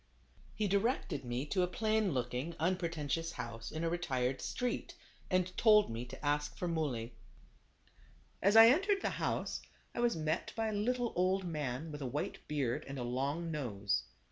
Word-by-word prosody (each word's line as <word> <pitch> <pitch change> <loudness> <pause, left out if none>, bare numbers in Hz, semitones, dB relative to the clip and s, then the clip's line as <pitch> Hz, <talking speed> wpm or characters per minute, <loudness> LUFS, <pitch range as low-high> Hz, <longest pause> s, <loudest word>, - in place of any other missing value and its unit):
He 210 -1 +1
directed 200 - 0
me 120 +2 -2
to 185 +5 0
a 180 - +3
plain 215 +1 +1
looking, 125 +5 -2
un 180 +4 +2
pretentious 165 -2 -2
house, 115 -1 -6
in 160 +1 -3
a 165 - +1
retired 130 -7 -1
street, 250 0 -2 0.3
and 185 -1 +1
told 210 - +6
me 115 +2 -4
to 135 +3 -9
ask 145 0 0
for 180 - -2
Muley. 135 -9 -1 1.3
As 200 +3 +4
I 225 +1 +11
entered 395 - +3
the - - +1
house, - - -1 0.3
I - - -4
was 240 -3 +3
met 155 +1 -1
by 225 -1 0
a - - -3
little 240 +3 0
old 185 +2 +2
man 150 -3 -3
with 150 0 -6
a 135 - -2
white 145 +4 -3
beard 145 -1 -1
and 140 0 -5
long 140 +7 -1
nose. 100 - -1
160 Hz, 170 wpm, -34 LUFS, 130-200 Hz, 1.3 s, I